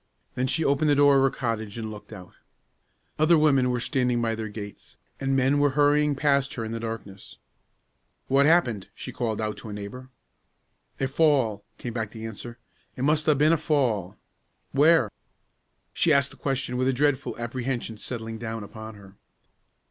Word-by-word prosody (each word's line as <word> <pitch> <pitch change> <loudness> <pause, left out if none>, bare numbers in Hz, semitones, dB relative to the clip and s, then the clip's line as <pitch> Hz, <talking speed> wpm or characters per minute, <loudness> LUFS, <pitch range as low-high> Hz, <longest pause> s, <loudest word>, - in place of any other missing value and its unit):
Then 130 +1 -1
she 160 +4 +1
opened 140 +2 +2
the 145 - +4
door 145 -1 +6
of - - +4
her 135 - +4
cottage 115 -5 -3
and 110 -1 -4
looked 105 +1 -11
out. 90 -4 -11 0.9
Other 160 +2 +5
women 135 -5 +4
were 125 -1 0
standing 125 -2 0
by 115 -1 0
their 110 -1 -4
gates, 105 -1 -9 0.2
and 135 0 0
men 135 +2 +3
were 145 0 +4
hurrying 145 0 +4
past 140 -1 +1
her 115 - -3
in 110 - -5
the 115 - -3
darkness. 110 -4 -7 0.9
"What's 140 +2 +4
happened?" 125 - +2
she - - -7
called 110 -3 -2
out, 110 -1 -2
to 110 - -9
a - - -6
neighbor. 105 +6 -8 0.9
"A 135 - +1
fall," 135 -8 +2
came 120 - -6
back 110 -3 -3
the 110 0 -8
answer; 115 +2 -8 0.4
"it 125 - -4
must 150 +2 +2
'a' 155 - +5
been 150 +3 +4
a - - +3
fall." 125 - 0 0.5
"Where?" 145 -5 +4 0.8
She 165 - +2
asked 140 -1 +3
the - - -14
question 130 -2 -2
with 130 +1 +1
a 135 - +2
dreadful 140 +1 0
apprehension 120 -1 -3
settling 115 -1 -6
down 115 -1 -5
upon 110 +1 -9
her. 100 -1 -15
125 Hz, 180 wpm, -26 LUFS, 110-140 Hz, 0.9 s, door